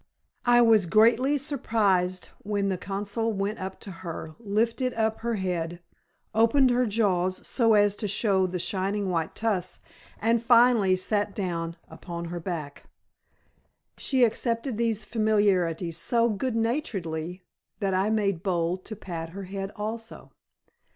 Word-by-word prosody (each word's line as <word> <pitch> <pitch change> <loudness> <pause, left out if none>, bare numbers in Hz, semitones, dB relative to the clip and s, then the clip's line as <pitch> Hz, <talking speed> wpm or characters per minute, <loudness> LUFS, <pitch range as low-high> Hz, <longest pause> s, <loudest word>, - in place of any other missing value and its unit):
I 240 0 +6
was 220 -5 +5
greatly 235 - +4
surprised 210 -10 0
when 200 -1 -1
the 190 - -1
consul 205 +4 -2
went 200 +1 -2
up 190 0 -6
to 200 - -8
her, 160 -2 -6
lifted 230 +4 0
up 220 -1 0
her 235 0 -1
head, 175 -3 -2 0.5
opened 230 +4 +4
her 245 0 +2
jaws 185 -4 0
so 225 -4 +3
as 205 -1 +4
to 210 - -3
show 195 -2 +2
the 180 0 -3
shining 195 +2 -1
white 165 -2 -2
tusks, 195 -5 -1 0.4
and 230 +1 +2
finally 235 -5 +5
sat 205 +2 -1
down 170 -4 -3
upon 170 -1 -7
her 175 - -4
hack. 155 -6 -5 1.1
She 260 -3 +1
accepted 230 +1 0
these 225 -2 0
familiarities 195 -7 +1
so 235 +3 +2
good 225 +3 -2
naturedly 185 - -2 0.4
that 195 -3 0
I 190 +3 +2
made 200 -5 0
bold 180 -1 -1
to 215 - -6
pat 170 -5 -6
her 200 - -5
head 195 +1 -5
also. 225 +2 -6
205 Hz, 140 wpm, -27 LUFS, 185-230 Hz, 1.1 s, I